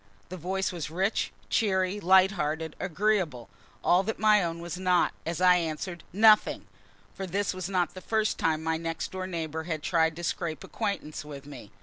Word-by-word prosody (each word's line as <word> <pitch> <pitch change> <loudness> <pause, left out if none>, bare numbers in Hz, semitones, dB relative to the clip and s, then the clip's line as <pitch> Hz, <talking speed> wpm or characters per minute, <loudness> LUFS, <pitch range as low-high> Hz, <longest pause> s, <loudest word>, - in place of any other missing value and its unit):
The 185 - -6
voice 190 +3 -2
was 170 -4 -5
rich, 190 +6 0 0.2
cheery, 190 -2 +1
light 190 0 +5
hearted, 160 -3 -3
agreeable; 180 - 0 0.3
all 180 +2 +4
that 215 +3 -3
my 215 -2 +4
own 165 -1 -3
was 175 +1 -6
not 180 -1 +2
as 165 0 -2
I 180 -1 +6
answered 170 +1 -4
"Nothing!" 215 +2 +5 0.5
for 190 - -5
this 195 +3 -1
was 185 0 -5
not 180 -3 0
the 185 - -9
first 220 +1 0
time 160 -1 +1
my 160 0 0
next 165 -1 -4
door 185 0 -4
neighbor 160 -3 -4
had 155 -3 -3
tried 160 -2 +2
to 175 - -7
scrape 165 -4 -3
acquaintance 200 -10 -4
with 140 -2 -9
me. 145 -8 -10
180 Hz, 185 wpm, -28 LUFS, 160-190 Hz, 0.5 s, I